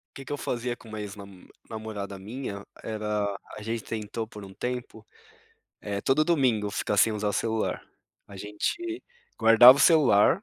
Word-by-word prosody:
Que 135 - -9
que 145 - -5
eu - - -3
fazia 120 -1 -3
com 115 - -16
uma 110 0 -6
ex 105 -1 -6
namo 100 -2 -13 0.2
namorada 105 -3 -6
minha 105 -1 -6 0.2
era 105 -1 -2 0.3
a 105 - -9
gente 115 +1 -3
tentou 110 0 -5
por 105 -2 -11
um 95 0 -11
tempo, 125 +4 -5 0.8
eh, 100 -1 -4
todo 150 +3 +2
domingo 125 -11 +2
ficar 105 - -1
sem 110 +2 +4
usar 105 -1 -1
celular, 110 +1 -1 0.5
a 100 - -12
gente 340 - -3 0.4
guardava 120 +4 +8
o - - +1
celular 155 - +5
110 Hz, 165 wpm, -27 LUFS, 105-125 Hz, 0.8 s, guardava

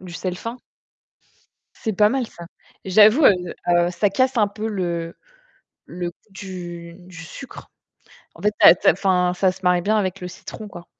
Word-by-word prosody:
du 180 -2 -11
sel 180 +2 -4
fin. 230 +6 -6 1.2
C'est 220 - -4
pas 210 +2 +4
mal 255 0 -1
ça. 170 -4 -12 0.4
J'avoue, 215 - +5
heu, - - +8 0.4
heu, 175 0 +3
ça 195 +3 0
casse 260 +4 +1
un 210 -3 +3
peu 215 +2 -5
le 170 -5 -3 0.7
le 175 0 -5
goût - - -25 0.2
du 175 -3 -8
du 180 -1 -15
sucre. 265 +10 -11 0.7
En - - -14
fait, 210 0 +1
ça - - +10
ça - - +6
enfin, 180 -1 +1
ça 185 0 +2
se 190 - -14
marie 180 -1 +3
bien 215 +4 +1
avec 195 -2 -2
le 180 - -5
citron, 210 +4 -10
quoi. 175 -3 -11
185 Hz, 180 wpm, -21 LUFS, 175-210 Hz, 1.2 s, ça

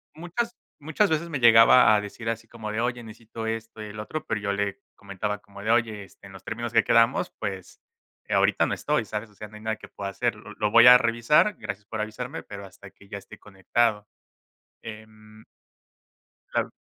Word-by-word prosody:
muchas 205 +9 -4 0.2
muchas 160 +6 0
veces 165 +2 -1
me 145 -4 -3
llegaba 115 0 +7
a 105 - +1
decir 110 +2 -8
así 115 0 -3
como 110 -2 -7
de: 110 +2 -2
"Oye, 120 -1 -2
necesito 115 0 -9
esto, 115 0 -5
y - - -6
el 105 +1 -9
otro", 150 +8 -5
pero 105 - -2
yo 100 -1 -1
le 100 +4 -2 0.2
comentaba 100 +1 -4
como 100 -1 -14
de: 110 - -3
"Oye, 110 -3 +1
este, 100 - -19
en 95 - -12
los 95 - -13
términos 120 +1 -5
que 115 - +5
quedamos 115 +2 +3
pues, 95 -2 -6 0.5
eh, - - -3
ahorita - - +3
no - - -2
estoy, - - -1
¿sabes?, 105 +1 -5
o 105 - -24
sea, 105 - -9
no 105 - -16
hay - - -14
nada 110 0 -2
que - - -13
pueda 100 -1 -6
hacer, 95 - -1
lo - - -12
lo 105 -1 -1
voy 115 +1 +8
a 125 - +11
revisar. 120 - +2
Gracias 100 +1 -6
por 110 0 -5
avisarme, 125 +7 -5
pero 100 0 -9
hasta 100 +1 -14
que 100 0 -21
ya 100 - -6
esté 100 - -14
conectado", 105 +2 -1 0.8
em 110 0 -12 1.1
Claro. - - -1
110 Hz, 210 wpm, -25 LUFS, 105-120 Hz, 1.1 s, a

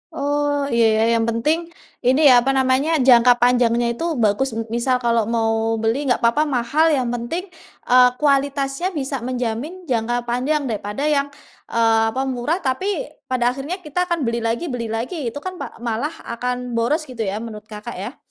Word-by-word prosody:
Oh, 290 0 0
iya, 235 -1 +3
ya, 220 - +2 0.2
yang 225 - 0
penting 305 +9 0 0.4
ini 260 +3 +4
ya 245 - +7
apa 270 +2 0
namanya? 265 +4 +2
Jangka 245 -1 +7
panjangnya 240 -1 +3
itu 235 +8 -4 0.2
bagus 215 +6 +2
m 225 - -2
misal 240 +2 +1
kalau 230 -2 +2
mau 225 -1 +1 0.3
beli 225 +3 +1
nggak 245 - +1
papa 235 +6 +3
mahal 290 +7 +2
yang 250 -3 -1
penting, 245 +10 -3 0.5
eee, 250 0 +7
kualitasnya 280 +2 +1
bisa 275 -2 -2
menjamin 255 +9 -3
jangka 240 0 0
panjang 255 +5 -1
daripada 210 +4 -4
yang, 280 0 +1 0.4
eee, 225 -1 +2
apa 265 - 0
murah 265 +5 -1
tapi 265 +9 -1 0.4
pada 245 -2 +1
akhirnya 295 +9 -6
kita 360 +4 -2
akan 340 -4 -1
beli 235 -1 -1
lagi 230 +7 -1
beli 235 -2 -3
lagi 240 +6 -3
itu 260 +5 -4
kan 370 -1 -6
pa - - -7
malah 240 +7 -2
akan 250 +1 -4
boros 245 +8 +1
gitu 250 -6 -7
ya 195 - -2
menurut 215 -2 -9
Kakak 215 +2 -8
ya? 235 +8 -6
250 Hz, 175 wpm, -21 LUFS, 230-285 Hz, 0.5 s, ya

